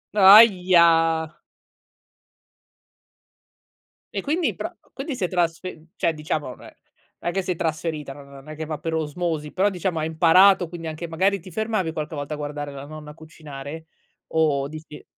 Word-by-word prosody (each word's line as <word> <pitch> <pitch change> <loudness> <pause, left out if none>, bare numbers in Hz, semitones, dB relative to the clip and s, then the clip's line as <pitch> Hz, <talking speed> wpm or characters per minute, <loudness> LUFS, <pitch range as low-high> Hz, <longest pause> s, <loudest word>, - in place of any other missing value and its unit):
Ahia! 180 -6 +6 2.9
E - - -2
quindi 320 +4 0
pro - - -6 0.2
quindi 270 +1 -5
si 220 - -4
è 180 - 0
trasfe 175 0 -1
mhmm, 155 - -20
cioè 165 - 0
diciamo 155 -2 -3
non 125 - -11
è - - -14 0.5
è - - 0
che 190 +2 -2
si 180 - -2
è - - -1
trasferita, 155 -3 -3
non 140 0 -13
non 140 +1 -13
è 155 - -7
che 160 +1 -5
va 155 -1 -4
per 165 - -4
osmosi, 155 -1 -3
però 195 +2 +2
diciamo 180 -3 -2
hai 155 - -1
imparato 175 +3 +5
quindi 165 0 -8
anche 160 +2 -5
magari 190 +5 +1
ti 185 - -12
fermavi 215 -4 -2
qualche 155 0 -5
volta 145 +1 -5
a - - -4
guardare 145 -1 -5
la 140 0 -8
nonna 150 0 -10
cucinare? 155 -1 -10 0.5
O 150 -4 +2
dici 155 0 -11
160 Hz, 170 wpm, -23 LUFS, 150-180 Hz, 2.9 s, Ahia